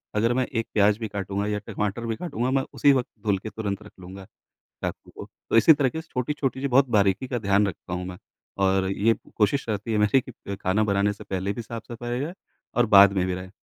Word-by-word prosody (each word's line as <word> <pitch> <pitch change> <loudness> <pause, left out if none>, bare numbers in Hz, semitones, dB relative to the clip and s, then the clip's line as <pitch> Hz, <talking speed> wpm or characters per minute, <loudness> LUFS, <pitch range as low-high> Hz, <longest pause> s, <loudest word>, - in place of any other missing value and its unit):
अगर 115 +3 +2
मैं 130 0 +1
एक 115 -4 -3
प्याज 105 0 +4
भी 110 -2 -4
काटूँगा 100 0 -3
या 105 0 -1
टमाटर 105 +3 -3
भी 115 -1 -2
काटूँगा 130 -6 -2
मैं 135 0 +2
उसी 145 - +4
वक़्त 130 -2 0 0.2
धुल 100 -2 +2
के 110 +3 -7
तुरंत 105 -1 -4
रख - - -13
लूँगा, 95 +1 -10 0.6
चाकू - - -5
को। - - -8 0.2
तो - - +3
इसी 160 +8 +8
तरीके 145 +2 0
से 165 - -22
छोटी-छोटी 130 +1 -2
जो 140 - -1
बहुत 130 +1 +4
बारीकी 100 +3 +2
का 125 - -2
ध्यान 100 0 +2
रखता 90 -1 -6
हूँ 90 +1 -3
मैं। 90 -1 -7 0.5
और 95 0 +2
ये 110 +3 +3 0.2
कोशिश 110 +6 +2
रहती 105 +2 -2
है - - +2
मेरी 105 +5 +4
कि 100 -3 -8
खाना 100 +4 +2
बनाने 100 0 +1
से - - -12
पहले 95 +1 -2
भी 120 - -5
साफ-सफाई 115 +1 -7
हो 120 - -1
जाए 170 +4 -5 0.4
और 120 -1 +4
बाद 100 -1 +8
में 95 -2 +1
भी 90 - -1
रहे। 90 0 -6
105 Hz, 235 wpm, -25 LUFS, 100-120 Hz, 0.6 s, इसी